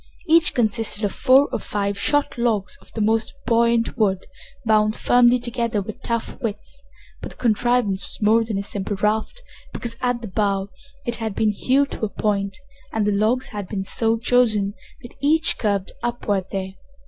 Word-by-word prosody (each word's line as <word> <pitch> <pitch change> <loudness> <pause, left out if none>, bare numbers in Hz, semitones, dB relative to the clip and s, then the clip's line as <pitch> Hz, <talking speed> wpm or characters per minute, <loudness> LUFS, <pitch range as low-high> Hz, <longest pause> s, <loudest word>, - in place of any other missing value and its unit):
Each 330 +1 +5
consisted 225 -2 +1
of 205 - +1
four 270 +3 +5
or - - -1
five 200 -1 -2
short 290 +7 +1
logs 215 -6 0
of - - -20
the 220 - -3
most 220 +4 +1
buoyant 235 0 +2
wood, 190 -3 +1 0.4
bound 215 0 +3
firmly 245 0 +4
together 235 -2 -2
with 200 +2 -7
tough 230 +3 -3
withes, 235 +5 -5 0.4
but - - -6
the - - -15
contrivance 235 -3 +1
was - - -6
more 225 +2 +5
than 220 -3 -3
a 200 - -2
simple 200 0 -4
raft, 215 - -1 0.3
because, 235 -1 -4
at 245 -1 -1
the - - -4
bow, 195 0 0 0.4
it 240 -2 -1
had 220 -3 -4
been 215 -1 +2
hewed 270 +7 +1
to - - -7
a - - -4
point, 200 -2 -1 0.3
and 220 -2 0
the 210 - +2
logs 220 +5 +1
had 205 -3 -6
been 195 -1 -3
so 225 +3 +1
chosen 225 -4 +2 0.3
that 240 - -11
each 315 +3 +2
curved 200 -3 -1
upward 210 -5 -1
there. 190 -1 -4
220 Hz, 180 wpm, -22 LUFS, 205-240 Hz, 0.4 s, Each